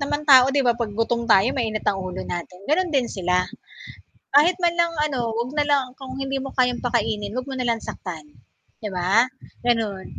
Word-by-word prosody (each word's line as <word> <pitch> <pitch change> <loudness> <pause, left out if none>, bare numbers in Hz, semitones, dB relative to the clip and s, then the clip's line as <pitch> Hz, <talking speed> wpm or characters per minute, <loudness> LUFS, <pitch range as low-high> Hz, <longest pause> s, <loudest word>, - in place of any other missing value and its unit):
naman 290 +1 -2
tao 255 -1 +9
di 275 - +4
ba - - +5
pag 215 -3 -2
gutom 235 +1 0
tayo 195 +5 +5
mainit 220 -3 -2
ang 195 - +1
ulo 180 - -5
natin, 175 +1 -6
ganon 355 +2 +2
din 255 -3 +2
sila, 180 -1 +1 1.0
kahit 335 +5 +6
man 345 -1 +2
lang 340 0 +2
ano, 275 -4 -2 0.2
'wag 240 +3 -2
na 295 - +3
lang 275 -2 +3
kung 265 -1 -8
hindi 270 0 -2
mo 270 - -5
kayang 250 -1 +1
pakainin 210 -4 -1
huwag 255 +2 -4
mo 265 - -4
na 250 -1 -1
lang 230 -1 0
saktan, 165 -5 -7 0.6
di 210 - -3
ba, 180 +1 -1 0.6
ganon, 215 -5 0
240 Hz, 200 wpm, -23 LUFS, 205-275 Hz, 1.0 s, tao